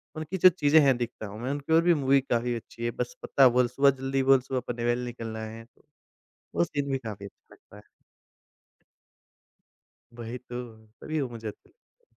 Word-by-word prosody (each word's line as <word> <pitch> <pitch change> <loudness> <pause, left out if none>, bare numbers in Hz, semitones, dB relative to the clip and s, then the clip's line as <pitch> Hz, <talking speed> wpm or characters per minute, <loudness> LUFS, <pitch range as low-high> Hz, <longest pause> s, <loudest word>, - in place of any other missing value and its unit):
उनकी 155 +4 -4
जो 185 - +8
चीजें 160 -3 +4
हैं 135 -3 +4
दिखता 120 -2 -5
हूँ 105 +2 -9
मैं 130 +3 -2
उनकी 145 +2 -2
और 165 - +6
भी 175 0 +5
मूवी 135 +1 +5
काफ़ी 120 -2 -1
अच्छी 115 0 -9
है। 120 - 0
बस - - -4
पत्ता 135 -1 +5
बोल, 125 0 +3
सुबह 140 +3 +3
जल्दी 135 0 -1
बोल, 135 0 +6
सुबह 130 0 -3
पनवेल 120 0 -1
निकलना 115 -2 -6
है। 115 +1 -9 0.9
वो 85 - +3
सीन 140 +7 -3
भी 135 - +1
काफ़ी 105 -5 -8
अच्छा - - -18
लगता 105 - -19
है। 105 - -13 2.4
वही 120 +1 -6
तो, 120 -2 -8 0.2
तभी 155 -1 -3
वो 130 - -2
मुझे 115 -2 -7
अच्छे 105 - -11
लगते 480 +1 -37
125 Hz, 185 wpm, -27 LUFS, 115-140 Hz, 2.4 s, जो